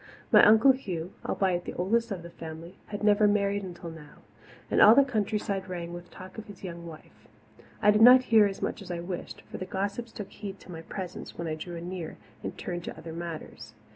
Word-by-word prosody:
My - - +8
Uncle 220 +5 +8
Hugh, 185 -9 -4
albeit 180 -3 0
the - - -6
oldest 230 +6 +1
of 190 -5 -5
the 170 - -10
family, 165 +3 -9
had 205 0 -6
never 210 0 +5
married 200 -1 +1
until 175 -3 -7
now, 150 -2 -14 0.5
and - - +4
all 215 +2 +9
the 280 - +7
countryside 205 -5 -2
rang 175 -1 -5
with 175 0 -9
talk 185 +4 -10
of 220 - -9
his 200 -2 -12
young 170 -2 -7
wife. 160 -2 -13 0.6
I 210 - +7
did 210 +1 +3
not 250 +2 +9
hear 220 -4 +5
as 195 - -6
much - - -2
as 195 - -10
I 175 -1 -3
wished, 175 +1 -6
for - - -9
the 185 - -4
gossips 200 +5 -3
took 205 -3 -8
heed 200 -2 -7
to 185 - -12
my 165 -1 -7
presence 180 +2 -7
when 170 - -4
I 155 - -2
drew 170 +3 -6
anear 170 -1 -6 0.2
and - - -6
turned 175 -1 -4
to - - -6
other 165 0 -8
matters. 160 -10 -7
185 Hz, 220 wpm, -28 LUFS, 170-210 Hz, 0.6 s, all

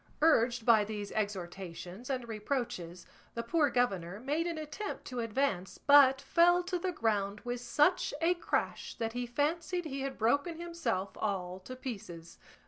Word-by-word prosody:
Urged 240 -7 +4
by 225 -3 +6
these 205 -1 -5
exhortations 190 +1 -5
and 255 -3 -2
reproaches 210 -7 -3 0.3
the 235 - -2
poor 295 +4 +2
governor 200 -7 0
made 295 +7 -1
an 335 -2 -3
attempt 310 +7 -5
to 250 -2 -5
advance, 230 -5 -1
but 275 -2 +6
fell 350 +4 +4
to 360 0 -2
the 365 +1 -1
ground 210 - -1
with 245 0 -4
such 295 +9 +2
a 335 +2 +3
crash 345 - -2
that 225 -2 -3
he 245 0 -3
fancied 330 +7 -1
he 275 -3 -4
had 270 0 -4
broken 285 +9 +1
himself 260 - -2
all 185 -3 -2
to 255 +7 -9
pieces. 195 -10 -8
245 Hz, 155 wpm, -32 LUFS, 205-300 Hz, 0.3 s, by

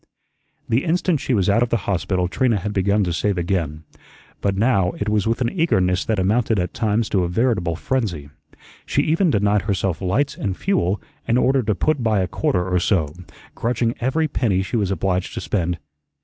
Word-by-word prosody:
The 115 +4 +1
instant 175 -1 +1
she 130 - 0
was 95 -4 +1
out 105 +3 +3
of 120 - +1
the 115 - +2
hospital 90 -1 0
Trina 115 +4 +1
had 105 +2 -4
begun 100 +2 +2
to 90 -2 -1
save 100 +3 0
again, 85 -4 -2 0.6
but 100 -1 0
now 100 -5 +2
it 105 - -3
was 105 -1 +1
with 115 +3 0
an 120 -1 +1
eagerness 95 - +1
that 110 - 0
amounted 110 +4 +1
at 90 -1 -1
times 110 0 0
to 95 -3 +1
a - - 0
veritable 90 -4 0
frenzy. 85 - -2 0.6
She - - +1
even 165 +4 +2
denied 105 -4 +2
herself 95 -2 -1
lights 120 +10 0
and 95 -2 -3
fuel 105 - 0 0.3
in 115 - +3
order 135 +1 +3
to 105 -3 0
put 150 - 0
by 110 -4 +2
a 90 - 0
quarter 90 +1 0
or 90 -1 +1
so, 80 -5 +1 0.4
grudging 115 0 0
every 155 +6 +1
penny 100 -9 0
she 95 - -4
was 105 -5 +1
obliged 95 0 -1
to - - -2
spend. 90 -3 -1
100 Hz, 195 wpm, -21 LUFS, 90-120 Hz, 0.6 s, out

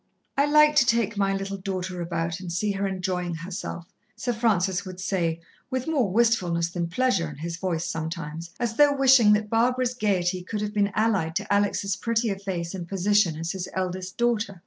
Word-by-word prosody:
"I 280 +1 +3
like 300 0 +5
to 270 - +6
take 230 -2 +2
my 195 -1 +1
little 195 0 -4
daughter 185 -1 -4
about 170 0 -2
and 180 -2 -6
see 205 +5 0
her 195 0 -1
enjoying 180 -2 -2
herself," 170 0 -6 0.2
Sir 245 - -2
Francis 200 -4 +1
would 185 -1 -9
say, 170 -4 -1 0.3
with 260 -1 -2
more 280 -10 +1
wistfulness 180 -7 +2
than 170 -1 -2
pleasure 195 -6 +1
in 150 - -9
his 165 +3 -5
voice 175 -3 -2
sometimes, 165 0 -5
as 235 -2 -2
though 290 -1 +5
wishing 260 -6 +6
that 210 0 0
Barbara's 250 +2 +2
gaiety 185 -6 0
could 205 +3 -4
have 210 0 -3
been 205 -1 +1
allied 200 -8 +1
to 205 +1 -1
Alex' 200 -1 +1
prettier 225 -1 -1
face 180 -3 -4
and 180 -3 -6
position 195 -2 +2
as 165 +2 -3
his 185 -2 -5
eldest 185 0 -3
daughter. 225 -5 0
195 Hz, 190 wpm, -25 LUFS, 175-225 Hz, 0.3 s, to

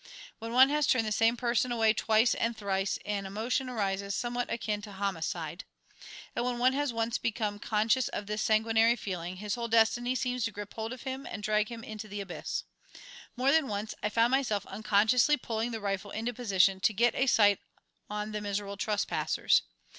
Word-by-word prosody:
When 225 +1 -6
one 260 +3 +7
has 300 0 +1
turned 240 -3 +3
the 215 - -2
same 225 +3 +3
person 240 +1 +1
away 225 -2 +3
twice 220 +2 +3
and 230 0 -1
thrice 195 -2 -1
an 200 -1 -2
emotion 235 +6 -2
arises 200 -4 -2
somewhat 245 0 -2
akin 210 -2 -2
to 205 -1 -9
homicide. 170 -4 -3 0.7
And - - 0
when 245 0 -1
one 255 +2 +3
has 290 -1 0
once 230 0 -1
become 210 -2 -2
conscious 220 +4 +1
of 205 - -5
this 210 +1 -3
sanguinary 225 +1 +3
feeling 180 -5 -5
his 205 +2 -4
whole 235 0 -2
destiny 230 +2 +3
seems 250 -1 -1
to 230 - -2
grip 205 0 -8
hold 225 0 -4
of 255 - -8
him 265 0 -5
and 210 - -6
drag 210 0 +1
him 230 -1 -8
into 215 0 -7
the 205 0 -6
abyss. 195 -3 -4 0.7
More 260 +2 +3
than 315 -2 +3
once 210 0 -3
I 210 - 0
found 230 +3 +2
myself 240 -7 +1
unconsciously 220 +7 +3
pulling 230 -1 -3
the 225 -2 -4
rifle 200 -1 -3
into 225 +4 -3
position 195 -5 +2
to 215 - +2
get 235 +3 +3
a 265 - +1
sight 205 -5 +5 0.5
on 210 +1 -4
the 210 0 -3
miserable 200 0 -3
trespassers. 210 0 +1
220 Hz, 190 wpm, -30 LUFS, 205-240 Hz, 0.7 s, one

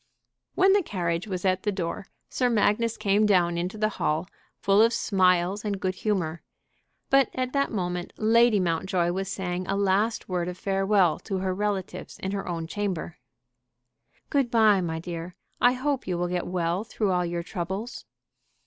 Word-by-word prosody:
When 385 +1 +5
the 405 - +4
carriage 175 - -2
was 185 -2 -4
at 185 0 +2
the 210 - 0
door 190 0 -4 0.2
Sir 250 -1 0
Magnus 225 0 +1
came 210 0 +2
down 175 -4 +3
into 180 +5 -3
the 215 0 +1
hall, 155 +4 0 0.3
full 200 +1 +4
of 230 +1 +4
smiles 185 -2 +2
and 205 -2 -2
good 185 0 -1
humor; 185 -5 -2 0.7
but 270 -2 +5
at 255 0 -2
that 280 0 +1
moment 180 -3 -3
Lady 225 0 +4
Mountjoy 175 0 0
was 195 +1 -3
saying 180 -2 -3
a 195 - 0
last 200 +3 +1
word 180 -2 -1
of 180 0 -5
farewell 195 -3 +2
to 195 -3 -4
her 185 0 -1
relatives 200 -1 -3
in 190 - -4
her 200 -1 -4
own 165 -2 -3
chamber. 180 -2 -4 1.1
"Good 275 -4 +2
bye, 220 -4 +4
my 165 -2 -2
dear; 170 +1 -6 0.3
I 245 - +6
hope 270 +1 -2
you 180 -2 -1
will 175 0 -1
get 180 -1 -2
well 175 +1 -1
through 215 -3 -1
all 180 -1 +1
your 170 0 -3
troubles." 190 +5 -5
190 Hz, 175 wpm, -26 LUFS, 175-215 Hz, 1.1 s, I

